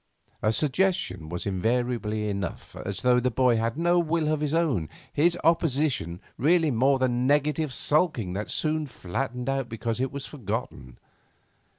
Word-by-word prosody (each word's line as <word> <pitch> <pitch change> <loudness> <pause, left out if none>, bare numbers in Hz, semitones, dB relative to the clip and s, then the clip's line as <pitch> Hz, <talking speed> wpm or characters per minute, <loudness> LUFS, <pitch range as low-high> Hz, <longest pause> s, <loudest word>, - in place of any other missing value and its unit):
A 110 - +2
suggestion 130 - 0
was 85 +1 -4
invariably 110 +2 -1
enough, 100 -5 -4
as 100 0 -5
though 125 -1 +5
the 125 +1 +1
boy 125 -1 +3
had 115 +3 -1
no 175 +1 +3
will 165 -2 +1
of 155 -1 +1
his 150 -2 0
own, 145 - +1 0.2
his 170 +4 +3
opposition 145 - +1 0.2
rarely 160 +2 +3
more 135 +3 +3
than 125 -1 +1
negative 150 +1 +1
sulking 135 - +1
that 100 +3 -4
soon 155 -1 0
flattened 125 +3 -4
out 135 -2 -1
because 115 +1 -3
it 130 0 -1
was 140 0 -5
forgotten. 105 - -5
125 Hz, 155 wpm, -26 LUFS, 110-150 Hz, 0.2 s, though